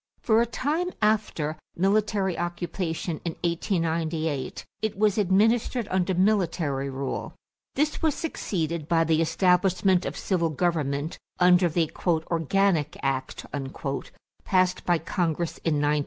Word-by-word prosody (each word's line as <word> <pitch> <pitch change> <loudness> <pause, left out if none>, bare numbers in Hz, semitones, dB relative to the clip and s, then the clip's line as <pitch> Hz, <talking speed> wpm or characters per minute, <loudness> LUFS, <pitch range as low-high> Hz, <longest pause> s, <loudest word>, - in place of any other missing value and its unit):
For 225 0 +4
a 235 - +1
time 305 +9 -1
after 205 -8 0 0.2
military 195 0 +1
occupation 175 -1 -3
in 170 - -2
1898, 165 -4 -1 0.2
it 220 -3 -2
was 210 0 +2
administered 220 +4 +2
under 185 0 +1
military 170 -8 +1
rule. 135 0 -4 0.4
This 300 +2 0
was 315 -3 +2
succeeded 170 - -3
by 165 -1 +3
the 160 0 +2
establishment 185 +2 +2
of - - -5
civil 170 -4 0
government 155 -2 -1 0.2
under 180 0 +5
the 160 -1 0 0.2
"organic 165 0 +1
act" 135 -1 -2 1.0
passed 185 -1 +2
by 175 -1 +4
Congress 170 -1 -2
in 160 -2 0
1900. 145 +1 +2
175 Hz, 120 wpm, -26 LUFS, 160-195 Hz, 1.0 s, under